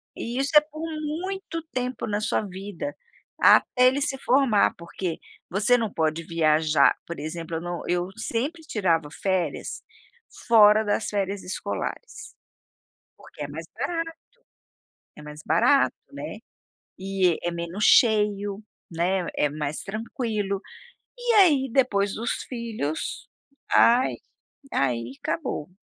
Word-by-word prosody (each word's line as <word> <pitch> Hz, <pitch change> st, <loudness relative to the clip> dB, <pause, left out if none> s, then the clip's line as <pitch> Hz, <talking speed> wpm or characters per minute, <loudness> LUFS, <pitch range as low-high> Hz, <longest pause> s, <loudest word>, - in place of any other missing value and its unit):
E, 240 Hz, +2 st, -4 dB
isso 275 Hz, +2 st, 0 dB
é 300 Hz, -, +10 dB
por 310 Hz, +1 st, -10 dB, 0.2 s
muito 335 Hz, +3 st, -4 dB
tempo 250 Hz, -1 st, -3 dB
na 205 Hz, 0 st, -1 dB
sua 215 Hz, -, 0 dB
vida, 200 Hz, -, -6 dB, 0.4 s
até 250 Hz, 0 st, +6 dB
ele 275 Hz, +3 st, +2 dB
se 270 Hz, -1 st, -1 dB
formar. 255 Hz, -5 st, +3 dB
Porque, 170 Hz, 0 st, -5 dB, 0.3 s
você 205 Hz, +7 st, +3 dB
não 225 Hz, -4 st, -2 dB
pode 160 Hz, -1 st, -1 dB
viajar 155 Hz, -2 st, +3 dB
por 170 Hz, -, -6 dB
exemplo, 165 Hz, +2 st, -5 dB
eu -, -, -5 dB
não 175 Hz, 0 st, -4 dB
eu, 175 Hz, +1 st, 0 dB
sempre 265 Hz, +9 st, -3 dB
tirava 170 Hz, -, 0 dB
férias, 185 Hz, -5 st, -2 dB, 0.7 s
fora 215 Hz, -2 st, +7 dB
das 205 Hz, 0 st, 0 dB
férias 200 Hz, -1 st, -2 dB
escolares. 350 Hz, -, -5 dB, 0.8 s
Porque -, -, -11 dB
é -, -, -4 dB
mais -, -, -7 dB, 1.8 s
barato, 270 Hz, +4 st, +3 dB, 0.2 s
né, -, -, -7 dB, 0.6 s
e 190 Hz, -3 st, +1 dB
é 175 Hz, -, 0 dB
menos 170 Hz, +4 st, -4 dB
cheio, 210 Hz, -3 st, +3 dB, 0.3 s
né, 175 Hz, +2 st, 0 dB
é 150 Hz, -, +2 dB
mais 150 Hz, 0 st, -4 dB
tranquilo. 215 Hz, -2 st, -3 dB, 0.6 s
E 485 Hz, -1 st, 0 dB
aí, 295 Hz, -10 st, +5 dB
depois 205 Hz, -7 st, +2 dB
dos 230 Hz, +2 st, -2 dB, 0.2 s
filhos, 225 Hz, -, -4 dB, 0.4 s
ai. 245 Hz, +2 st, +5 dB, 0.6 s
Aí, 120 Hz, -2 st, -1 dB
acabou! 165 Hz, -2 st, -3 dB
205 Hz, 120 wpm, -25 LUFS, 170-250 Hz, 1.8 s, é